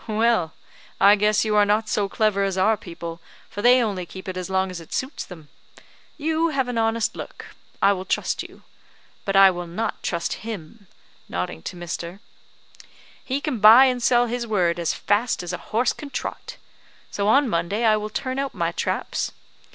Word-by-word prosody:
"Well, 220 -6 +1 0.5
I 200 +1 +7
guess 210 +1 +2
you 215 -1 0
are 210 - +6
not 210 +2 +1
so 205 -2 0
clever 205 -1 +1
as 195 -1 -1
our 215 +4 +3
people, 170 -3 -8 0.3
for 205 - -5
they 245 +2 +6
only 190 -5 -3
keep 185 +3 -10
it 185 - -4
as 185 -1 -5
long 190 0 0
as 180 - -6
it 165 - -12
suits 260 +4 -3
them. 160 -5 -12 0.7
You 320 +2 +1
have 270 -4 0
an 245 -2 -2
honest 225 0 0
look; - - -9 0.3
I 200 - +6
will 185 -1 -5
trust - - -1
you; - - -12 0.6
but 195 - -1
I 195 -1 +8
will 175 -1 -6
not 215 +6 -3
trust 170 -1 -3
him," 210 -1 -8 0.4
nodding 85 -2 -4
to 180 - -7
Mr., 175 +1 -6 1.0
"he 265 +1 -2
can 285 -5 -3
buy 225 +6 +9
and 250 -2 0
sell 240 0 +4
his 240 0 -3
word 175 -5 +1
as 170 -2 0
fast 215 -1 0
as 175 0 -5
a 180 - -4
horse 235 +3 +1
can 290 - -9
trot. - - -6 0.5
So 200 0 -1
on 275 +6 +4
Monday 200 +4 -1
I 215 -1 +5
will 215 0 -3
turn 260 +4 -3
out 275 0 -3
my - - 0
traps. - - -2
210 Hz, 190 wpm, -23 LUFS, 180-235 Hz, 1.0 s, buy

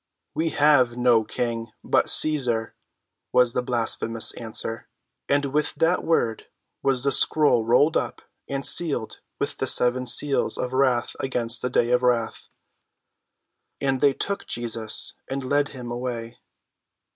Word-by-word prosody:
"We 165 +1 0
have 145 -6 +3
no 120 -2 +4
king 115 0 -4
but - - +2
Cæsar!" 125 -7 +1 0.6
was 125 -1 +3
the - - 0
blasphemous 115 -2 -1
answer. 115 -1 -4 0.4
And 145 0 +2
with 150 +1 0
that 165 +4 +1
word 120 -9 0 0.3
was 135 -2 +1
the 140 - +2
scroll 135 -3 +3
rolled 145 +7 +4
up - - -2 0.2
and 140 0 -3
sealed 140 -10 -1 0.2
with - - -2
the - - -2
seven 125 +1 +2
seals 140 +3 +1
of 125 0 -3
wrath 130 -3 +1
against 120 -3 -1
the 125 - -1
day 120 -1 +1
of 125 0 +3
wrath. 120 -3 0 1.3
And 135 -2 -1
they 140 -2 +4
took 200 +8 -4
Jesus 115 -2 -2
and 135 0 -4
led 145 +2 +1
him 125 -3 -8
away. 120 -1 -5
125 Hz, 140 wpm, -24 LUFS, 115-140 Hz, 1.3 s, no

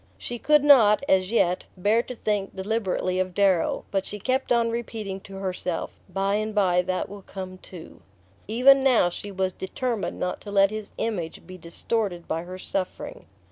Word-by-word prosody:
She 240 - -5
could 300 +2 +4
not, 245 -6 +6
as 185 -1 +3
yet, 185 -5 +1
bear 210 +5 +3
to 250 - -8
think 205 -3 -2
deliberately 190 -2 -1
of 185 -1 -2
Darrow; 195 -4 +2
but 195 -1 0
she 210 - -6
kept 260 +6 -1
on 235 -1 +3
repeating 220 -4 -4
to 195 0 -12
herself 185 -3 -3 0.2
"By 195 +1 0
and 215 0 -3
bye 180 -3 +3
that 185 0 -2
will 200 0 -10
come 185 -1 -8
too." 175 -3 -12 0.5
Even 260 +5 +6
now 245 -9 +4
she 205 +3 -7
was 190 -1 -1
determined 230 +3 -3
not 180 - -2
to 205 - -9
let 200 0 +4
his 215 -1 -6
image 180 -8 -3
be 185 - -10
distorted 175 +1 -3
by 160 - -2
her 185 +1 -7
suffering. 195 - -4
195 Hz, 180 wpm, -25 LUFS, 185-225 Hz, 0.5 s, not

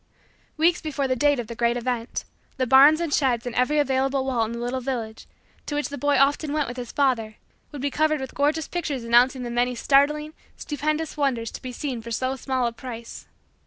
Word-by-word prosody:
Weeks 335 +3 +3
before 285 -3 -2
the 255 - +1
date 290 +1 +2
of 240 - -3
the 235 - -7
great 235 +1 +1
event, 245 -1 -3 0.3
the 260 - +1
barns 275 +5 +7
and 335 -4 -2
sheds 250 -5 +1
and 245 - -4
every 255 +5 +1
available 270 -1 +1
wall 250 -4 +1
in 220 - -6
the 235 - -5
little 245 +2 -2
village, 235 -4 -5 0.4
to 295 - -3
which 295 - -1
the 285 - -5
boy 290 0 +2
often 285 +2 +2
went 300 -2 0
with 245 - -6
his 245 -2 -6
father, 240 -6 0 0.4
would 285 -2 -7
be 285 - 0
covered 310 +1 +1
with 265 -1 -6
gorgeous 300 +2 0
pictures 295 -8 -3
announcing 245 +2 +3
the 240 - -4
many 245 +1 0
startling, 300 +4 +2 0.2
stupendous, 305 +2 -2
wonders, 250 -6 0
to - - -9
be 255 - -6
seen 250 -2 -4
for 230 - -9
so 255 +3 -1
small 260 -1 -1
a 235 - -1
price. 235 -1 -9
265 Hz, 215 wpm, -24 LUFS, 240-290 Hz, 0.4 s, barns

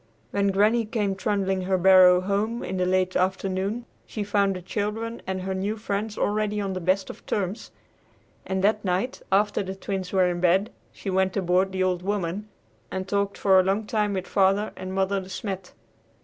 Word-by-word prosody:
When 200 0 +1
Granny 210 +4 +3
came 210 -3 -1
trundling 195 -1 -1
her 185 +1 +1
barrow 180 0 +7
home 205 +5 -1
in 190 - -3
the 180 0 +1
late 185 0 +1
afternoon, 190 +4 -1 0.2
she 215 - -4
found 200 -1 +1
the 180 - -6
children 220 +4 -3
and 190 0 -2
their 190 +1 -3
new 200 +3 -2
friends 210 0 -3
already 210 0 0
on 195 -2 -2
the 185 - -3
best 190 +2 +1
of - - -16
terms; 200 +1 -2 0.7
and 190 0 -2
that 210 +1 +2
night, 195 +7 -1
after 205 +2 +2
the 190 -1 -5
Twins 190 -1 -4
were 190 -2 +3
in 175 -1 -1
bed, 185 +4 +2 0.2
she 195 - -5
went 190 0 +1
aboard 185 +1 +2
the 185 0 0
"Old 180 -1 0
Woman" 200 +1 -2 0.4
and 190 0 -4
talked 200 0 -1
for 190 -2 +5
a - - +4
long 195 +3 0
time 210 -1 0
with 190 -1 -2
Father 195 +2 +2
and 185 0 -6
Mother 195 +1 0
De 185 - -11
Smet. 190 -1 -5
195 Hz, 190 wpm, -25 LUFS, 185-205 Hz, 0.7 s, barrow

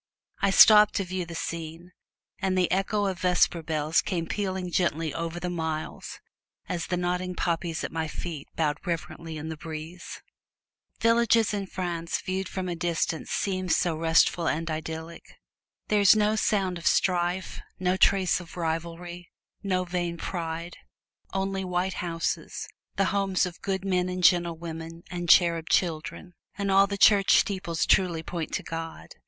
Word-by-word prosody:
I 200 - +3
stopped 210 +2 +8
to 195 - +1
view 180 -1 -4
the 170 - -7
scene, 165 +1 -5 0.5
and 190 -1 0
the 180 -1 +2
echo 200 +2 +1
of 190 -2 -2
vesper 180 -2 +2
bells 155 0 +1
came 170 -4 -2
pealing 190 -1 -3
gently 165 -4 0
over 165 +1 -4
the 180 - -3
miles, 160 -2 -4 0.5
as 170 -2 -3
the 180 - -1
nodding 180 +1 -2
poppies 170 -2 -1
at - - -4
my 160 -1 -2
feet 155 -2 -6
bowed 150 -1 0
reverently 165 -1 -4
in 155 +1 -6
the 160 - -5
breeze. 160 +3 -8 0.8
Villages 230 -1 +3
in 200 -2 -2
France 175 -3 -3
viewed 185 0 -3
from 185 -1 -4
a 175 - -2
distance 165 -1 -2
seem 185 -2 -1
so 170 -1 +2
restful 165 +1 +3
and 165 +1 -1
idyllic. 160 +1 -6 0.6
There 210 -1 +2
is 200 +1 +7
no 215 0 +2
sound 190 -5 0
of 170 - -2
strife, 180 0 +1 0.2
no 180 0 +1
trace 190 -1 +3
of 175 0 -12
rivalry, 170 +1 -4 0.3
no 185 -2 0
vain 175 -1 -3
pride; 170 0 -5 0.5
only 195 0 -2
white 180 +1 -1
houses 165 -1 -3 0.3
the 195 - +2
homes 195 -2 +1
of 175 -1 -8
good 195 -1 -2
men 185 -1 +1
and 180 0 -4
gentle 170 -1 +4
women, 165 0 -7
and 175 -1 -4
cherub 170 -2 +5
children; 175 +1 -1 0.2
and 200 -1 -1
all 195 +1 +6
the 200 0 -3
church 200 -1 +6
steeples 185 -5 0
truly 175 -4 +2
point 165 -1 -4
to - - -2
God. 165 - -6
175 Hz, 160 wpm, -27 LUFS, 165-190 Hz, 0.8 s, stopped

